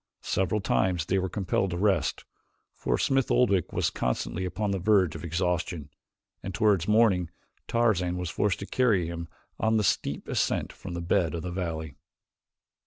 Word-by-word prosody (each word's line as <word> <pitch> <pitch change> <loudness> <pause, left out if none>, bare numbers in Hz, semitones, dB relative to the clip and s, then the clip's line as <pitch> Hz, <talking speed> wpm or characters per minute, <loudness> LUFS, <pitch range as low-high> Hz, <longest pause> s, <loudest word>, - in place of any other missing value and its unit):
Several 95 +3 0
times 90 -3 +1
they 95 +3 +1
were 95 0 -2
compelled 95 0 0
to 85 - -3
rest, 95 -1 +1 0.5
for - - -1
Smith 135 -2 +1
Oldwick 100 -9 +2
was - - 0
constantly 75 +8 -2
upon 100 +3 -2
the 95 - -1
verge 95 -3 +3
of - - -7
exhaustion, 85 -3 -2 0.5
and 95 -2 -5
toward 100 -3 +2
morning 105 -6 +3 0.4
Tarzan 95 -7 +1
was 90 -2 -3
forced 105 +1 +1
to - - -4
carry 105 -7 +2
him 85 0 -5 0.3
on 110 0 +2
the 105 - +2
steep 75 -6 -1
ascent - - 0
from 90 -3 -8
the 85 - -3
bed 85 -1 +1
of 85 - -4
the 90 - -4
valley. 80 -4 -4
90 Hz, 170 wpm, -27 LUFS, 85-105 Hz, 0.5 s, verge